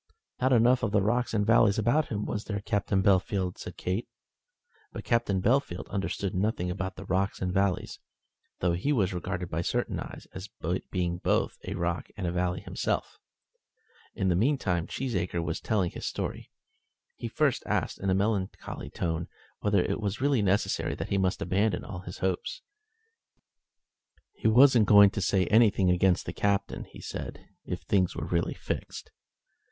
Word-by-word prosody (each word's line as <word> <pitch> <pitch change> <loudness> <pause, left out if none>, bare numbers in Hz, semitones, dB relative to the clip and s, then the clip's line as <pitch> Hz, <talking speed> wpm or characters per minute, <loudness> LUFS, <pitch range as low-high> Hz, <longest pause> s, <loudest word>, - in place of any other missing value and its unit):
"Not 130 +1 +3
enough 125 +1 +5
of 110 - 0
the 105 - +3
rocks 120 +4 +1
and 105 -2 +1
valleys 110 -2 +4
about 120 +8 +2
him, 105 -1 -3
was 105 - -3
there, 100 -2 -3
Captain 100 -2 0
Bellfield?" 95 -1 +1
said - - -8
Kate. 95 +6 -2 0.8
But - - -7
Captain 110 -6 +1
Bellfield 120 -6 +1
understood 100 0 -2
nothing 95 -2 0
about 95 0 -4
the 100 - -9
rocks 95 +2 0
and 90 -1 -2
valleys, 95 -1 0 0.6
though 90 - +2
he 90 +12 0
was 100 -9 +1
regarded 90 0 -4
by 80 - -1
certain - - -1
eyes - - -8
as 95 +1 -7 0.4
being 85 -1 -1
both - - 0
a 95 - -3
rock 85 -2 -2
and 100 - -3
a 85 - 0
valley 90 0 -1
himself. - - -3 1.0
In 95 - 0
the 90 - +3
meantime 95 - +1
Cheesacre 90 -10 -2
was 80 -1 -3
telling 100 -6 0
his - - -5
story. - - -4 0.7
He - - -4
first - - +1
asked, - - -1
in 100 - -1
a 95 - +3
melancholy 100 -1 -2
tone, 85 0 -2 0.3
whether 100 -3 +2
it - - -2
was 100 -1 -2
really 135 -3 +2
necessary 100 0 +1
that - - -5
he 100 - +1
must 95 +1 0
abandon 100 +1 +1
all 95 -4 -6
his 90 -1 -8
hopes. 95 -1 -2 1.7
"He - - -1
wasn't 120 -1 +6
going 100 -1 +8
to 100 - -3
say 95 0 +2
anything 105 -3 +4
against 90 0 +2
the - - -5
Captain," 100 -1 -1
he - - -13
said, - - -6 0.2
"if - - -4
things 95 -3 +1
were - - -3
really - - -1
fixed. - - -5
100 Hz, 170 wpm, -28 LUFS, 90-110 Hz, 1.7 s, going